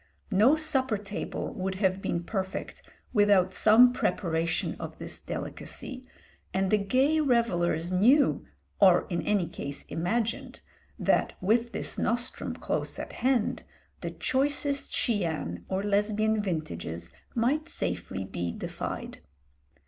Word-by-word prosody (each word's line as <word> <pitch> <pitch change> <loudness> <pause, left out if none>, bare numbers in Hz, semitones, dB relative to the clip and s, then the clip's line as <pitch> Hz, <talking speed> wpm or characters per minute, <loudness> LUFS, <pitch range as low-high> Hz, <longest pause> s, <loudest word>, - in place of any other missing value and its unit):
No 215 +9 +6
supper 265 -7 +1
table 205 +4 -5
would 190 -4 -3
have 190 -1 +1
been 170 -2 -1
perfect 190 0 -4 0.3
without 200 -4 +4
some 235 +5 +6
preparation 165 -7 0
of - - -6
this - - -6
delicacy, 255 -1 -6 0.5
and 190 0 +1
the 215 - +4
gay 260 +10 +2
revellers 185 - +1
knew, 245 +11 +4 0.4
or 185 -3 +6
in 170 - 0
any 205 -4 +1
case 140 -3 -6
imagined, 225 +7 -2 0.4
that - - +2
with 230 +5 +2
this - - -4
nostrum 240 +2 -1
close - - -3
at - - -6
hand 250 -3 +1 0.4
the - - -4
choicest 280 +1 0
Chian 165 - -1
or 190 +1 -1
Lesbian 210 +1 +2
vintages 85 - -4 0.2
might 285 +8 +1
safely 90 +2 -3
be 85 -2 -3
defied. - - -5
205 Hz, 120 wpm, -28 LUFS, 175-245 Hz, 0.5 s, No